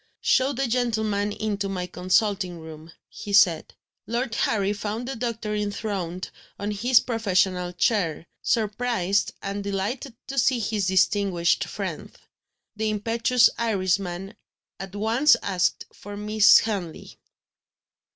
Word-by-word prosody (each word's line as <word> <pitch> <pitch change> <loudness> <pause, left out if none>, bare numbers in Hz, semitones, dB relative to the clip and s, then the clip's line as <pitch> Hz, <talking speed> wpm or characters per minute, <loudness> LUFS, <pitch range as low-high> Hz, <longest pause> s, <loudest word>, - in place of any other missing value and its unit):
"Show 260 +1 +3
the 270 0 -1
gentleman 220 -4 0
into 205 -2 -2
my 185 -2 -3
consulting 185 0 0
room," 160 0 -11 0.2
he 205 - -9
said. 180 -5 +4 0.3
Lord 235 +1 -2
Harry 205 -3 +1
found 215 +3 -4
the 270 - -4
doctor 225 -2 -3
enthroned 200 -4 -3 0.3
on 205 +1 -3
his 240 +4 +4
professional 185 -6 0
chair, 175 -4 0 0.2
surprised 215 -3 0
and 200 +1 -4
delighted 205 +6 -3
to 275 0 -2
see 255 +1 +3
his 210 -3 -1
distinguished 190 -2 +2
friend. - - -6 0.6
The 215 +1 -1
impetuous 230 +3 +3
Irishman 195 -3 -1 0.5
at 195 0 -8
once 230 +8 +4
asked 185 -2 0
for 205 0 -9
Miss 210 0 +6
Henley. 195 -7 -3
205 Hz, 120 wpm, -25 LUFS, 190-225 Hz, 0.6 s, Miss